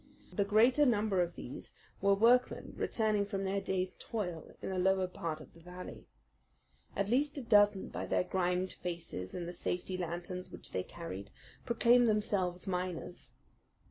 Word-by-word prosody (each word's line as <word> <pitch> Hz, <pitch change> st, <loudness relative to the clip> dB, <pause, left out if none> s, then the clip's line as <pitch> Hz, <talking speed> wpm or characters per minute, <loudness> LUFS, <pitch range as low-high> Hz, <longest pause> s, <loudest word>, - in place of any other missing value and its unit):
The 200 Hz, -, +2 dB
greater 235 Hz, +8 st, +5 dB
number 210 Hz, -7 st, +3 dB
of 175 Hz, 0 st, -1 dB
these 125 Hz, -, -7 dB, 0.3 s
were 200 Hz, 0 st, +5 dB
workmen 240 Hz, +4 st, +3 dB
returning 215 Hz, -2 st, +1 dB
from 200 Hz, -1 st, -3 dB
their 195 Hz, +1 st, 0 dB
day's 185 Hz, -1 st, -1 dB
toil 180 Hz, -8 st, -4 dB
in -, -, -4 dB
the 185 Hz, -, -1 dB
lower 190 Hz, 0 st, +3 dB
part 165 Hz, -3 st, -4 dB
of 155 Hz, -, -13 dB
the 170 Hz, -, -16 dB
valley. 180 Hz, +2 st, -9 dB, 0.9 s
At 200 Hz, 0 st, 0 dB
least 285 Hz, +5 st, +2 dB
a 275 Hz, -, -3 dB
dozen, 205 Hz, -3 st, +4 dB
by -, -, -4 dB
their -, -, +2 dB
grimed 180 Hz, 0 st, 0 dB
faces 170 Hz, -, -5 dB
and 175 Hz, -1 st, -4 dB
the 175 Hz, -, -5 dB
safety 180 Hz, +1 st, -2 dB
lanterns 175 Hz, +1 st, -4 dB
which -, -, -7 dB
they 95 Hz, -, 0 dB
carried, 100 Hz, -, -7 dB, 0.4 s
proclaimed 240 Hz, 0 st, +5 dB
themselves 195 Hz, -4 st, +1 dB
miners. 180 Hz, -2 st, -4 dB
190 Hz, 160 wpm, -33 LUFS, 175-210 Hz, 0.9 s, greater